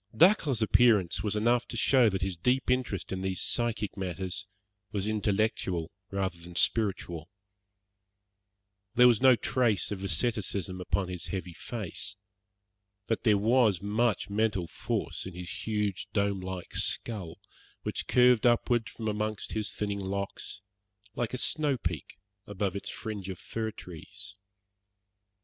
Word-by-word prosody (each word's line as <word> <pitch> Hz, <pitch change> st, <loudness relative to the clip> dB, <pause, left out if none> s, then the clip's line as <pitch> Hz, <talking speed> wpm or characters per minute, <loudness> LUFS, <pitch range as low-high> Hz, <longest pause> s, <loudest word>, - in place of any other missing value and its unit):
Dacre's 155 Hz, -, +5 dB
appearance 105 Hz, -7 st, +4 dB
was 105 Hz, +1 st, -1 dB
enough 120 Hz, +3 st, +2 dB
to -, -, -5 dB
show 130 Hz, -4 st, +5 dB
that 95 Hz, -2 st, -2 dB
his 95 Hz, -2 st, -1 dB
deep 125 Hz, +9 st, +1 dB
interest 125 Hz, -7 st, -1 dB
in 95 Hz, -1 st, -3 dB
these 95 Hz, -1 st, -1 dB
psychic 115 Hz, -3 st, +1 dB
matters 95 Hz, +1 st, -4 dB, 0.4 s
was 100 Hz, -3 st, -2 dB
intellectual 105 Hz, -5 st, 0 dB, 0.2 s
rather 95 Hz, -3 st, -2 dB
than 85 Hz, +1 st, -11 dB
spiritual. 90 Hz, -7 st, +1 dB, 1.7 s
There 125 Hz, 0 st, +7 dB
was 120 Hz, -3 st, +5 dB
no 130 Hz, -1 st, +7 dB
trace 115 Hz, -5 st, +1 dB
of 100 Hz, -2 st, -4 dB
asceticism 95 Hz, -1 st, 0 dB
upon 95 Hz, +1 st, 0 dB
his 90 Hz, -2 st, -2 dB
heavy 90 Hz, -3 st, -4 dB
face, 105 Hz, 0 st, -4 dB, 0.9 s
but 115 Hz, +2 st, -2 dB
there 105 Hz, -3 st, +5 dB
was 110 Hz, -2 st, +3 dB
much 105 Hz, -1 st, +1 dB
mental 105 Hz, -3 st, 0 dB
force 85 Hz, -, -3 dB
in 95 Hz, -, -9 dB
his 90 Hz, +2 st, -6 dB
huge, 105 Hz, -3 st, -1 dB
dome 100 Hz, -1 st, +1 dB
like 95 Hz, -1 st, -6 dB
skull, 100 Hz, -8 st, 0 dB, 0.4 s
which -, -, -3 dB
curved 125 Hz, -1 st, +5 dB
upward 120 Hz, -1 st, +2 dB
from 110 Hz, -1 st, -6 dB
amongst 105 Hz, 0 st, -2 dB
his 110 Hz, -2 st, -2 dB
thinning 100 Hz, -1 st, -3 dB
locks, 100 Hz, 0 st, -4 dB, 0.5 s
like 120 Hz, +1 st, -2 dB
a -, -, -2 dB
snowpeak 125 Hz, -, -1 dB, 0.3 s
above 100 Hz, -1 st, -2 dB
its 100 Hz, -, -4 dB
fringe 105 Hz, -3 st, -5 dB
of 95 Hz, -, -5 dB
fir 110 Hz, +4 st, -4 dB
trees. 90 Hz, 0 st, -10 dB
105 Hz, 135 wpm, -29 LUFS, 95-115 Hz, 1.7 s, There